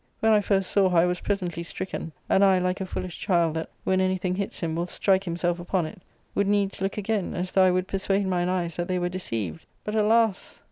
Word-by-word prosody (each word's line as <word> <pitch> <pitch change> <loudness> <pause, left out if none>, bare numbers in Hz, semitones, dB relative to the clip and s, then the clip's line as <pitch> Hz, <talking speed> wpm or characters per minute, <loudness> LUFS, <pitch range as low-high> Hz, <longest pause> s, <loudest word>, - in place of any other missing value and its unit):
" - - -42
When 220 - +3
I 210 -1 +5
first 195 -2 0
saw 195 -2 +4
her 180 - +1
I 165 - +6
was 180 0 -1
presently 180 -5 -2
stricken; 170 -1 -5 0.2
and 195 - +4
I, 190 -1 +5
like 180 +1 -1
a 190 - -3
foolish 180 -1 -5
child, 170 -5 +2
that, 160 0 -4
when 190 0 +2
anything 185 -1 0
hits 195 +1 -4
him, 165 -2 -1
will 170 +1 -1
strike 190 +1 +1
him 170 0 -2
self 175 0 0
upon 175 0 -1
it, 180 +4 -9 0.3
would 200 - +1
needs 200 -2 +1
look 195 +2 -1
again, 210 -2 -1
as 180 +1 -3
though 190 -1 +5
I - - +5
would 185 +1 0
per 195 - -2
suade 195 +1 +1
mine 180 -1 0
eyes 175 -3 -1
that 175 0 -2
they 185 - 0
were 175 0 0
deceived. 115 - -4 0.2
But, 210 - -4
alas 220 -1 +2
185 Hz, 250 wpm, -26 LUFS, 175-195 Hz, 0.3 s, I